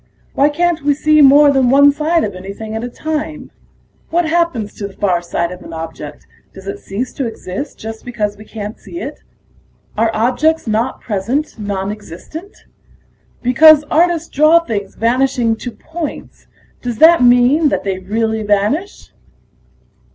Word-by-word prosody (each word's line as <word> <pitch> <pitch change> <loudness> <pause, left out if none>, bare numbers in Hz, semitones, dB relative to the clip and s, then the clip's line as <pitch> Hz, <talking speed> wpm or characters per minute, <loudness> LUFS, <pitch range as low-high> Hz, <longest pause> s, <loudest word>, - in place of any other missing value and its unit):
Why 285 +2 +3
can't 340 +2 0
we 285 0 +1
see 305 +1 +3
more 285 +1 +7
than 265 -3 +2
one 285 +2 +6
side 315 +3 0
of 205 - -3
anything 200 +4 -8
at 220 +1 -4
a 245 - -4
time? 310 +3 -5 0.6
What 345 +1 +1
happens 315 -11 0
to 200 - -6
the 195 - -15
far 185 -4 0
side 170 0 -2
of 180 - -9
an - - -10
object; 160 -2 -8 0.3
does 190 0 -12
it 195 - -5
cease 230 +6 -5
to 270 -4 -3
exist 225 +4 -6
just 220 0 -8
because 215 -4 -3
we 210 - -13
can't 210 0 -7
see 345 - -9
it? - - -7 0.7
Are 225 +1 +2
objects 255 +9 +1
not 225 +3 -1
present 235 +7 -2
nonexistent? 205 - -7 0.8
Because 300 +5 +6
artists 335 0 +2
draw 310 +4 +4
things 210 -11 -5
vanishing 245 0 +1
to 245 - -6
points, 320 +4 -8 0.3
does 240 -2 -4
that 330 +4 +6
mean 245 +6 +4
that 190 -5 -2
they 190 -2 -2
really 220 +3 -2
vanish?" 210 - -1
245 Hz, 155 wpm, -16 LUFS, 205-305 Hz, 0.8 s, more